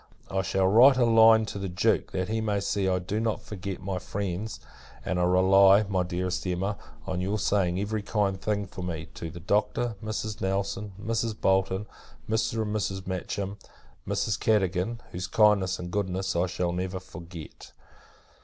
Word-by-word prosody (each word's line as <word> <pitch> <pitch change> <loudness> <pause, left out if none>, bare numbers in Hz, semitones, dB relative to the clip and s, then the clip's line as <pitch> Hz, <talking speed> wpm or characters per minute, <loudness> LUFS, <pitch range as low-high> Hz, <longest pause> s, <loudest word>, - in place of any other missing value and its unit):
I 95 0 +1
shall 95 0 +1
write 120 +7 +7
a 125 - +4
line 115 -1 +6
to 100 - -6
the 95 -1 -3
Duke, 90 +1 +1
that 95 0 -2
he 110 +1 -1
may 105 -2 0
see 100 -1 0
I 90 - +2
do 90 +4 -2
not 110 -1 0
forget 95 -2 -6
my 95 -1 -2
friends; 100 +3 -4 0.5
and 90 - -1
I - - +2
rely, 95 +3 +6
my 95 -2 0
dearest 90 +1 -2
Emma, 95 +3 -1 0.3
on 90 0 -2
your 100 +3 -1
saying 95 -3 +1
every 105 +2 -2
kind 100 -2 -1
thing, 105 -1 -1
for 90 0 -9
me, 85 -3 -4
to 85 - -6
the 85 +2 -9
Doctor, 105 +6 0
Mrs. 110 0 -4
Nelson, 100 +1 -2
Mrs. 115 0 -2
Bolton, 95 +1 +1 0.4
Mr. 110 0 0
and 105 0 -3
Mrs. 95 -2 -2
Matcham, 95 +2 -4 0.5
Mrs. - - 0
Cadogan; 105 +1 +1
whose 90 +1 -4
kindness, 100 -3 +3
and 90 0 -7
goodness, 95 -1 -1
I 85 +2 +2
shall 90 0 -1
never 95 +1 -3
forget. 85 -3 -11
95 Hz, 170 wpm, -27 LUFS, 90-105 Hz, 0.5 s, write